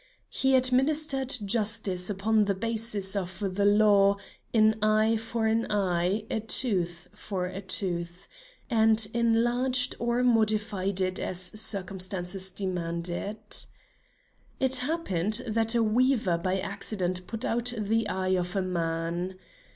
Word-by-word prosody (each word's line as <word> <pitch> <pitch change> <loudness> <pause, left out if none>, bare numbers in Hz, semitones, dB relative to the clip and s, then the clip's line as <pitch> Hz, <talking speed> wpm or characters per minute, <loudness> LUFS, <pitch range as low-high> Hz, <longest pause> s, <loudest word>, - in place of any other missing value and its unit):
He 265 0 +2
administered 270 +1 +2
justice 205 -3 0
upon 210 +2 +1
the 200 -1 -1
basis 215 -2 -1
of 185 -1 -4 0.2
the 200 +1 0
law, 205 -1 +4 0.3
'An 220 -1 +3
eye 215 +1 +2
for 225 0 -3
an 220 0 0
eye, 190 +1 -1
a - - -1
tooth 185 -7 +2
for 190 -3 -5
a 185 +2 -6
tooth,' 180 -2 -1 0.4
and 220 -2 +4
enlarged 240 +2 +2
or 235 +1 0
modified 215 -5 +1
it 185 0 -1
as 180 - -2
circumstances 190 -1 -1
demanded. 175 +1 -4 1.2
It 265 0 +4
happened 240 - +1
that 225 0 0
a 230 - +3
weaver 225 -5 +1
by 185 +2 -1
accident 185 -2 -3
put 225 +1 -4
out 240 +1 0
the 215 +1 -1
eye 185 -1 -2
of 180 +1 -2
a 195 - 0
man. 170 +1 -3
210 Hz, 125 wpm, -27 LUFS, 185-225 Hz, 1.2 s, law